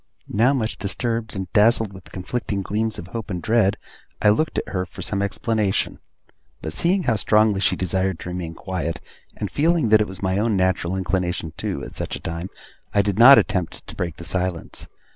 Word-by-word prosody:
Now 115 +6 +4
much 115 -5 -1
disturbed, 115 +2 -1
and 95 -1 -3
dazzled 110 -1 +4
with 95 -1 -13
conflicting 100 +1 -3
gleams 110 +2 -1
of 85 - -8
hope 115 0 -5
and 90 -3 -2
dread, 110 -1 +2 0.4
I 105 - +4
looked 155 +10 +1
at - - -2
her 90 -2 -1
for - - -9
some 100 -1 -2
explanation. 105 0 0 0.6
But 80 -1 -5
seeing 180 - +1
how 115 -6 +2
strongly 105 0 +3
she - - +3
desired 95 0 -1
to - - -6
remain 90 -2 -5
quiet, 85 -3 -3 0.4
and 100 -3 -4
feeling 160 -4 +2
that 110 0 +6
it 105 - 0
was 95 +1 -9
my 95 +1 +1
own 110 -1 +1
natural 95 -1 +1
inclination 90 -3 -1
too, - - -3
at - - -7
such - - -4
a - - -7
time, 85 +2 -4 0.5
I 100 - +5
did 100 0 -1
not 135 +4 +10
attempt 90 -3 0
to - - -10
break 85 -3 -3
the - - -8
silence. 90 -1 -3
100 Hz, 200 wpm, -23 LUFS, 90-110 Hz, 0.6 s, not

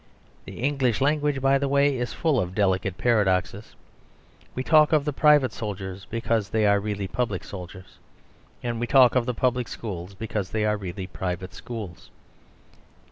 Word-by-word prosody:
The - - -9
English 135 -4 +1
language, 145 0 +1
by 135 0 +4
the 140 - 0
way, 140 0 +3
is 125 -1 -3
full 155 -6 +1
of 90 -2 -3
delicate 95 -2 0
paradoxes. 100 -2 0 0.8
We 130 - -2
talk 155 +1 +5
of 150 -2 +3
the 150 - -1
private 145 -2 +4
soldiers 100 -2 -6
because 115 -2 -1
they 110 -1 +1
are 100 0 +4
really 100 -1 -3
public 105 -4 -2
soldiers; 90 -1 -10 0.6
and 120 -1 -2
we 120 - -2
talk 130 -2 +6
of 125 -1 +1
the 125 - -1
public 125 -1 0
schools 95 -3 -7
because 105 -2 -4
they 110 -1 -1
are 105 0 +2
really 95 -1 -6
private 90 0 -5
schools. 105 -8 -8
110 Hz, 165 wpm, -25 LUFS, 95-130 Hz, 0.8 s, talk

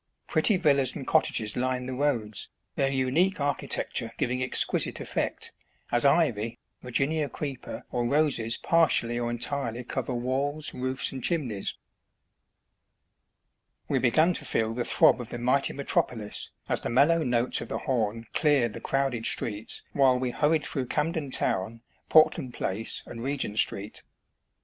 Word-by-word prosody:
Pretty 210 - +4
villas 140 -7 +2
and 135 - -6
cottages 110 -1 +1
lined 125 0 -1
the 130 - -4
roads, 125 -6 -1 0.2
their 135 - +1
unique 135 +9 +1
architecture 140 -4 -1
giving 125 +1 -1
ex 130 - +5
quisite - - -1
effect, - - -3 0.4
as 120 +2 +3
ivy, 120 -7 +2 0.2
Virginia 140 +4 -1
creeper 140 -4 -6
or 120 -1 -1
roses 140 -6 +1
par 165 -1 +3
tially 120 -3 0
or 120 - -1
entirely 120 0 -2
cover 125 0 -3
walls, 140 +5 -1
roofs, 130 +1 0
and 130 -2 -7
chimneys. 130 - -1 2.1
We - - +1
began 155 +8 +3
to - - -4
feel 110 0 0
the 120 +1 -3
throb - - +4
of 120 - -8
the - - -5
mighty 130 +3 +2
metropolis 120 -6 -2 0.2
as - - +1
the - - -3
mellow 150 +7 +4
notes 120 -1 +3
of - - -6
the - - -3
horn 115 -4 -2
cleared 140 -8 +2
the - - -8
crowded 135 -4 0
streets 105 -1 -1
while 130 -2 +4
we 125 -1 -2
hurried 150 +3 +1
through 130 -3 -3
Camden 155 +1 -1
town, 115 -2 -1 0.3
Portland 155 -5 +4
Place, 105 +4 -1
and 115 - -9
Regent 125 -5 -1
Street. 100 +2 0
130 Hz, 150 wpm, -27 LUFS, 120-145 Hz, 2.1 s, ex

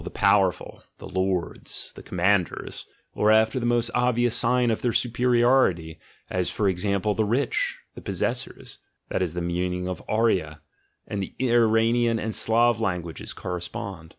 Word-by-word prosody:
"the - - -6
power 95 -3 +3
ful," - - -13 0.2
"the - - -10
lords," 95 -2 -2
"the - - -10
commanders"), 90 0 -1 0.3
or 105 - +2
after 110 +3 +4
the 120 - -1
most 120 -1 +1
obvious 120 -1 +2
sign 125 0 +2
of 110 - -2
their 120 - +1
superiority, 120 -9 +2 0.3
as 90 -1 -1
for 105 - 0
example 100 +2 0
"the 110 - 0
rich," 120 +7 0 0.2
"the - - -10
possessors" - - -4 0.3
(that - - -1
is 85 -2 -2
the 90 - -2
meaning 90 +1 -2
of 90 - -4
arya; 95 -9 +1 0.5
and 100 - -3
the 95 - -6
Iranian 115 -1 +3
and 110 0 -3
Slav 115 +1 +2
languages 90 -6 -3
correspond). 90 -1 -6
105 Hz, 150 wpm, -25 LUFS, 90-120 Hz, 0.5 s, after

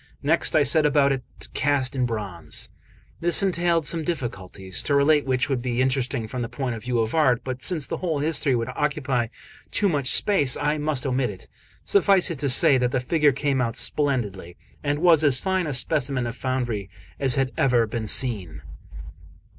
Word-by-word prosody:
Next 160 +3 +1
I 155 - +5
set 155 +3 +3
about 145 -1 +3
to 135 -2 -1 0.3
cast 140 -1 0
it - - -3
in 125 - +2
bronze. 95 -9 -4 0.5
This 175 +4 +5
entailed 170 -4 +1
some 165 +1 0
difficulties, 95 - -4
to 145 - 0
relate 145 0 +3
which 130 +2 0
would 135 -4 -2
be 120 -1 -3
interesting 130 -2 -1
from 125 +2 -5
the 115 - -4
point 130 -4 -4
of 110 - -7
view 125 +1 -2
of 110 +1 -3
art; 130 -7 +2
but 130 -1 -6
since 160 -6 0
the - - -4
whole 165 -5 -2
history 145 -2 0
would 115 +1 -2
occupy 135 -3 -1 0.4
too 205 - +1
much 145 -7 -1
space, 145 -6 +4
I 150 +1 -1
must 150 -4 -1
omit 130 -2 0
it. 95 -3 -11 0.4
Suffice 195 -2 +3
it 155 - -6
to 140 - -1
say, 135 +1 +4
that 125 0 +1
the 130 - -1
figure 150 +3 +2
came 135 -1 -1
out 115 0 -2
splendidly, 105 - -1 0.3
and 145 0 -1
was 165 -3 +5
as 140 -3 +4
fine 190 -3 -1
a - - -3
specimen 130 -2 0
of 120 0 -5
foundry 120 -7 -3 0.3
as 135 -3 +3
had 135 -1 0
ever 125 -3 +2
been 110 0 -5
seen. 95 - -1
135 Hz, 195 wpm, -23 LUFS, 120-150 Hz, 0.5 s, I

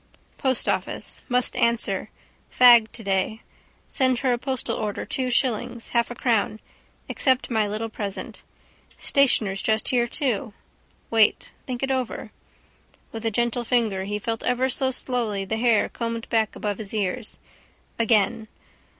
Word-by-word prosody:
Postoffice. 260 -2 -1
Must 250 0 +2
answer. 235 0 +1 0.4
Fag 240 -3 +7
today. 200 0 -1 0.4
Send 260 -2 +1
her 255 -2 +2
a 240 - -2
postal 260 0 -2
order 210 -2 -3
two 255 -1 -2
shillings, 235 -2 -1
half 235 -1 +1
a 245 - -6
crown. 220 -3 0 0.5
Accept 260 -1 +1
my 220 -2 +2
little 215 +2 -3
present. 205 -3 -6 0.6
Stationer's 220 -8 +2
just 220 0 +1
here 240 -2 +2
too. 230 -6 -2 0.6
Wait. 220 -2 +3 0.2
Think 255 +1 -2
over 255 -2 -1
it. - - -10 0.8
With 225 0 -4
a - - +3
gentle 240 +2 0
finger 220 -6 0
he 205 +1 -2
felt 225 +2 -3
ever 250 +1 +1
so 265 +1 +2
slowly 235 -6 -1
the 220 +3 -2
hair 230 -2 +3
combed 230 -1 -4
back 220 -2 +1
above 205 -2 -3
his 215 0 -5
ears. 210 +3 -2 0.6
Again. 220 -1 +2
230 Hz, 140 wpm, -24 LUFS, 215-250 Hz, 0.8 s, Fag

